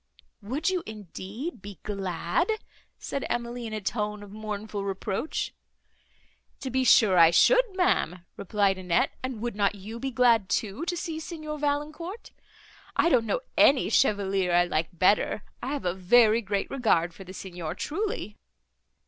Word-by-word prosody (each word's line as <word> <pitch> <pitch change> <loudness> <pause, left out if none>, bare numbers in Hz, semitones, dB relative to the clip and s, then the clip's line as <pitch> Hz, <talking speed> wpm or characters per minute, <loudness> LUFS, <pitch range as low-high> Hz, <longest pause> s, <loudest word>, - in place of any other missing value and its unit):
"Would 275 - -1
you, 365 -2 0
indeed, 215 - -7
be 200 -2 -9
glad?" 190 - -1 0.5
said 275 - -4
Emily, 240 0 -3
in 220 - -7
a 215 - -2
tone 210 0 -3
of 200 - -12
mournful 210 -1 -5
reproach. 195 +7 -3 1.1
"To 265 - -4
be 260 +1 +1
sure 205 -7 +6
I 165 -1 +9
should, - - +5
ma'am," 180 - +1
replied 200 -1 +1
Annette, 185 +9 +1
"and 255 -4 -4
would 240 -3 -2
not 205 0 +1
you 215 +4 -8
be 270 - -2
glad 235 -6 +3
too, 215 - -1
to 350 0 -2
see 325 -1 -4
Signor 310 -2 -6
Valancourt? 300 +8 -3 0.6
I 340 - +3
don't 235 -7 +3
know - - 0
any 270 -1 +5
chevalier 195 -6 +2
I 175 0 +4
like 160 -2 -1
better, 190 +4 +2 0.2
I 245 - -5
have 285 - -4
a 175 - +1
very 220 +4 +4
great 200 -2 -2
regard 175 -10 +2
for 195 - -11
the 185 - -11
Signor, 175 -4 -6
truly." 390 - -3
215 Hz, 155 wpm, -27 LUFS, 190-270 Hz, 1.1 s, I